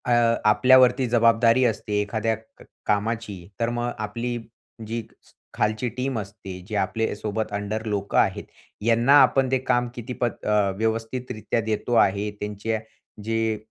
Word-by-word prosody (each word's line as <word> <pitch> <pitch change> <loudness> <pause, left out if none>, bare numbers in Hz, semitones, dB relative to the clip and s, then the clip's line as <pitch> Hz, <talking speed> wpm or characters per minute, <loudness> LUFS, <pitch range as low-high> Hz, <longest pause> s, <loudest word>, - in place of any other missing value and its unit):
अ, 125 - 0 0.4
आपल्यावरती 130 +3 +5
जबाबदारी 115 +1 +4
असते 105 -3 -1
एखाद्या 110 +2 -1 0.2
क - - -15 0.2
कामाची, 105 -3 -2
तर 115 0 +1
मग 120 0 -2
आपली 120 +3 -3 0.5
जी 115 +1 -3 0.2
स - - -24 0.2
खालची 110 +3 0
टीम 130 -1 -1
असते, 100 -2 -8
जे 110 - -5
आपल्यासोबत 110 +1 -2
अंडर 105 +2 -3
लोकं 100 -2 -2
आहेत, - - +2 0.4
यांना 120 +4 +4
आपण 135 -1 +3
ते 130 - +3
काम 120 0 +2
किती 120 +1 -6
पद 120 -1 +2
अ, 105 -2 +2
व्यवस्थितरीत्या 115 +1 -2
देतो 110 +2 -2
आहे. 100 +2 -2
त्यांच्या 105 +2 -2 0.4
जे 115 0 0
110 Hz, 140 wpm, -24 LUFS, 105-120 Hz, 0.5 s, आपल्यावरती